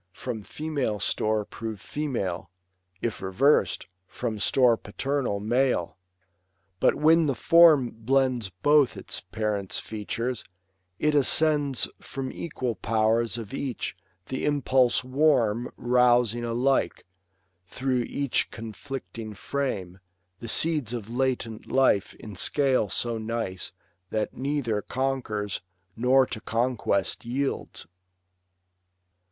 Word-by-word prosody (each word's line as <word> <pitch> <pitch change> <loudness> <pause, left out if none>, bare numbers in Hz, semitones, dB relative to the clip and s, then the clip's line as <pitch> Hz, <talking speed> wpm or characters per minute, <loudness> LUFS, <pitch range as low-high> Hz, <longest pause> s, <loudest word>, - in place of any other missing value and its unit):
From 120 -2 -5
female 140 -4 -3
store 110 0 0
prove 110 -1 -6
female; 100 - -3 0.5
if 115 -4 -2
revers'd. 110 +11 +2 0.2
From 110 -1 -4
store 125 +2 +4
paternal, 125 0 -2
male. 120 -3 +1 0.8
But - - +4
when 160 +1 +4
the 135 - 0
form 155 -2 +6
Blends 125 -1 +1
both 145 +10 +3
its - - -3
parents' 105 -3 -2
features, 115 +3 -3 0.5
it 150 +6 +1
ascends 145 -1 +3
From 135 -1 -5
equal 130 -7 -3
powers 110 +1 +1
of 115 +1 -7
each; 135 -3 -3 0.3
the 130 - -4
impulse 135 -4 +2
warm 125 -4 +2
Rousing 120 -1 +3
alike, 120 +4 0 0.6
through 130 +3 -1
each 140 -3 0
conflicting 115 -1 -7
frame. 100 -10 -3 0.4
The 115 - -7
seeds 150 -2 +2
of 115 -1 -7
latent 125 -3 -2
life 130 -7 +3
in 105 -2 -10
scale 130 +1 +2
so 115 +4 -2
nice 110 -5 -4 0.4
That 110 +1 -2
neither 130 -6 -1
conquers, 125 -7 -2 0.3
nor 130 +3 +4
to 110 -3 -6
conquest 115 -4 0
yields. 135 +4 -3
120 Hz, 105 wpm, -26 LUFS, 110-135 Hz, 0.8 s, form